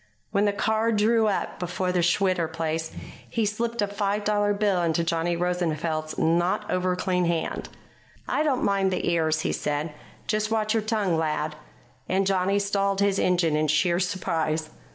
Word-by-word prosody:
When 200 +1 +2
the 205 - +3
car 220 +3 +1
drew 220 +1 +3
up 200 - -2
before 180 +1 -2
the 180 -1 +1
Schwitter 175 -1 +2
place, 160 0 -3 0.4
he 225 -2 0
slipped 230 +2 -1
a - - 0
five 205 0 -1
dollar 205 0 +2
bill 200 -3 +1
into 170 0 +1
Johnny 165 +1 0
Rosenfeld's 165 -3 -1
not 175 +6 +1
over 185 0 +1
clean 180 -1 0
hand. 170 -1 -2 0.6
"I - - 0
don't 285 -5 +1
mind 195 -1 +2
the 185 - -2
ears," 160 -2 +1
he - - -1
said. 150 +1 -2 0.3
"Just 215 0 0
watch 215 -1 +1
your 225 - +2
tongue, 210 -6 0
lad." 155 -1 -1 0.5
And 190 +1 +2
Johnny 195 +1 +2
stalled 200 -1 0
his 200 -1 +2
engine 175 -4 +2
in 155 0 +1
sheer 170 +4 +2
surprise. 160 -4 -1
185 Hz, 170 wpm, -25 LUFS, 165-205 Hz, 0.6 s, the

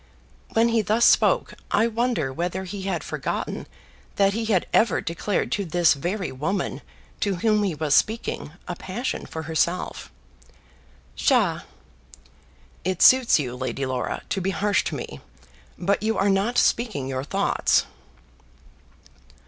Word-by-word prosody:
When 230 +1 +4
he 230 -1 +2
thus 215 +4 +2
spoke, - - +4 0.2
I 215 - +3
wonder 235 - -1
whether 175 +5 -3
he 195 +1 -6
had 170 -4 -2
forgotten - - -4 0.5
that 195 0 +3
he 225 +1 -2
had 205 -5 +2
ever 230 - +3
declared 170 +4 -2
to 205 - 0
this 175 -2 +3
very 180 +7 -3
woman 155 +10 -2 0.4
to 200 -2 0
whom 210 +3 +2
he 195 -6 0
was 150 -1 0
speaking, 220 -6 0 0.2
a 175 - -4
passion 210 +9 -4
for 160 - -6
herself. 160 +3 -2 1.0
"Psha!" - - +2 1.2
"It 185 0 0
suits 255 -2 +7
you, 125 -5 -3
Lady 130 +1 -3
Laura, 130 -1 -3
to 195 - -1
be 190 - -1
harsh 205 +1 +1
to - - -2
me, - - -7 0.6
but 195 +3 0
you 220 +1 0
are 195 +1 +2
not 200 +5 +1
speaking 215 - +1
your 130 -1 -3
thoughts." 145 - +1
190 Hz, 140 wpm, -24 LUFS, 160-215 Hz, 1.2 s, suits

